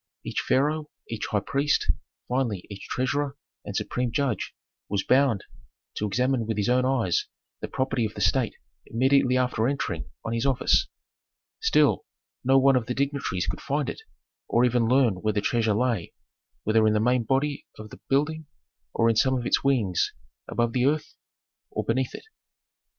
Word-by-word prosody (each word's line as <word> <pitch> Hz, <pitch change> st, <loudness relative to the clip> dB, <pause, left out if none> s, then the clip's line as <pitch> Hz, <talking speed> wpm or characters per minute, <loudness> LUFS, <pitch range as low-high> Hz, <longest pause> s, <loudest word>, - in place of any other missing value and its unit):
Each -, -, -2 dB
pharaoh, 150 Hz, +3 st, +1 dB, 0.2 s
each 115 Hz, -2 st, -4 dB
high 105 Hz, -, 0 dB
priest, 140 Hz, +5 st, +1 dB, 0.4 s
finally 120 Hz, -7 st, -1 dB
each 100 Hz, -, -8 dB
treasurer 140 Hz, +2 st, -1 dB, 0.3 s
and -, -, -7 dB
supreme 125 Hz, -1 st, -1 dB
judge 135 Hz, -6 st, -1 dB, 0.3 s
was 100 Hz, -1 st, 0 dB
bound 130 Hz, -6 st, +3 dB, 0.5 s
to 105 Hz, -, 0 dB
examine 125 Hz, +2 st, 0 dB
with 110 Hz, -2 st, -2 dB
his 105 Hz, +3 st, +1 dB
own 125 Hz, +1 st, +3 dB
eyes 125 Hz, -9 st, +1 dB, 0.3 s
the -, -, -4 dB
property 130 Hz, -2 st, -1 dB
of 105 Hz, -, -5 dB
the 105 Hz, -, -5 dB
state 110 Hz, +4 st, +2 dB, 0.3 s
immediately 130 Hz, +1 st, +3 dB
after 125 Hz, -3 st, +1 dB
entering 140 Hz, +1 st, -2 dB, 0.2 s
on 115 Hz, -, -2 dB
his 115 Hz, 0 st, 0 dB
office. 135 Hz, -2 st, +3 dB, 0.7 s
Still, 450 Hz, 0 st, +3 dB, 0.4 s
no 135 Hz, +1 st, +5 dB
one 135 Hz, 0 st, +5 dB
of 125 Hz, -3 st, 0 dB
the 125 Hz, -, -2 dB
dignitaries 140 Hz, -10 st, -1 dB
could 90 Hz, -, -4 dB
find 145 Hz, +1 st, -1 dB
it, -, -, -11 dB, 0.5 s
or 120 Hz, +2 st, +3 dB
even 120 Hz, -2 st, +2 dB
learn 125 Hz, -5 st, +3 dB
where 110 Hz, 0 st, +1 dB
the 105 Hz, -, +1 dB
treasure 110 Hz, 0 st, +1 dB
lay, 115 Hz, -6 st, -1 dB, 0.5 s
whether 110 Hz, +1 st, +3 dB
in 105 Hz, -, +3 dB
the 105 Hz, -, +2 dB
main 125 Hz, +3 st, +3 dB
body 135 Hz, +5 st, 0 dB
of 110 Hz, -1 st, -10 dB
the -, -, -11 dB
building 150 Hz, +3 st, +1 dB, 0.5 s
or 115 Hz, -, +3 dB
in 115 Hz, -, +3 dB
some 130 Hz, +4 st, +3 dB
of 120 Hz, -, -4 dB
its -, -, +2 dB
wings, 115 Hz, -10 st, +1 dB, 0.3 s
above 120 Hz, -1 st, 0 dB
the 125 Hz, +1 st, +2 dB
earth 150 Hz, +1 st, 0 dB, 0.6 s
or -, -, -3 dB
beneath 130 Hz, +2 st, -1 dB
it. -, -, -10 dB
125 Hz, 170 wpm, -26 LUFS, 110-135 Hz, 0.7 s, no